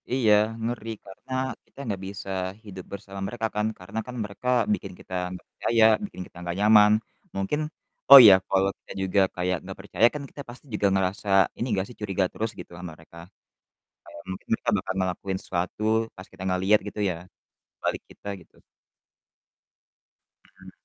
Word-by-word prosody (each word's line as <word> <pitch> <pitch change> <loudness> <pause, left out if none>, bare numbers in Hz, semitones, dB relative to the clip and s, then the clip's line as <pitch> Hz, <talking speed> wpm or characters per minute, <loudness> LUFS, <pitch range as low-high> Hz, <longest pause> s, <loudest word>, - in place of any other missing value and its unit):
Iya, 120 -5 +4 0.3
ngeri, 115 -1 -3 0.2
karena 100 +7 -14 0.3
kita - - -37
enggak 100 -6 -3
bisa 100 0 -7 0.4
hidup 95 -3 -9
bersama 100 -1 -8
mereka, 115 +1 -3
kan, 105 0 +1
karena 90 +5 -5
kan 125 - -7
mereka 105 +4 -8 0.3
bikin 205 - -4
kita - - -12 0.2
enggak 90 0 -9
percaya 115 -1 +2 0.2
bikin 200 - -9
kita - - -17
enggak 85 0 -4
nyaman 105 0 +7 0.5
mungkin 95 +11 -1 0.5
Oh, 140 - +15
iya, 100 -3 +10
kalau 95 0 +3
kita - - -15
juga 95 +1 +2
kayak 90 0 0
enggak 95 0 -8
percaya 100 +2 +3
kan 145 - -4
kita 145 - -9
pasti 125 +4 -12
juga 105 -1 +2
ngerasa 95 +1 -1 0.3
ini - - -2
enggak 95 -2 0
sih, 125 - -12
curiga 100 -2 0
terus 110 +1 -2
gitu - - -9
sama 90 0 -7
mereka, 80 +1 -16 0.9
kayak 85 - -12
mungkin 95 - -8
kita - - 0
bakal 95 - -2
ngelakuin 95 +1 -2
sesuatu 90 +3 -3 0.3
pas 95 - -10
kita - - -11
enggak 90 -1 0
lihat 105 +2 +5
gitu, 105 - -6
ya, 85 - -3 0.6
di - - -70
balik - - -1
kita, 100 - -9
gitu. - - -22 2.0
Mhm. - - -12
100 Hz, 175 wpm, -26 LUFS, 95-110 Hz, 2.0 s, Oh